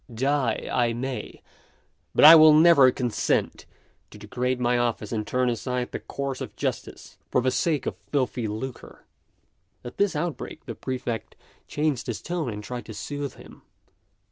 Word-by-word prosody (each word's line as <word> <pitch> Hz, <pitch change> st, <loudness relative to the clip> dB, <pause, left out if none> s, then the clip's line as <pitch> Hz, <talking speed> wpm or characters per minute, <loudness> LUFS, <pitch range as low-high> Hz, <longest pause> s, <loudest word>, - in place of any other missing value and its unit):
Die 130 Hz, 0 st, -1 dB
I 120 Hz, -2 st, +1 dB
may, 130 Hz, +2 st, -6 dB, 0.7 s
but -, -, +6 dB
I 155 Hz, -, +12 dB
will 155 Hz, -1 st, +8 dB
never 155 Hz, -4 st, +7 dB
consent 125 Hz, -3 st, -1 dB, 0.4 s
to -, -, -13 dB
degrade 125 Hz, +5 st, -3 dB
my 125 Hz, 0 st, +1 dB
office 115 Hz, -3 st, -2 dB
and 110 Hz, -2 st, -3 dB
turn 125 Hz, +1 st, 0 dB
aside 125 Hz, +1 st, -2 dB
the -, -, -4 dB
course 140 Hz, -2 st, -5 dB
of -, -, -7 dB
justice -, -, -5 dB
for -, -, +2 dB
the 130 Hz, +1 st, +1 dB
sake 145 Hz, +1 st, 0 dB
of -, -, -3 dB, 0.2 s
filthy 130 Hz, -4 st, -1 dB
lucre." 120 Hz, +5 st, -7 dB, 0.8 s
At 120 Hz, -, -9 dB
this 200 Hz, -4 st, +1 dB
outbreak 165 Hz, +1 st, -5 dB
the -, -, -5 dB
Prefect 125 Hz, -4 st, -5 dB, 0.3 s
changed 150 Hz, -4 st, -1 dB
his 115 Hz, -5 st, -3 dB
tone, 170 Hz, 0 st, -3 dB
and 105 Hz, 0 st, -7 dB
tried 120 Hz, +3 st, -6 dB
to 110 Hz, -, -8 dB
soothe 145 Hz, +6 st, -5 dB
him.... -, -, -15 dB
125 Hz, 160 wpm, -25 LUFS, 120-145 Hz, 0.8 s, I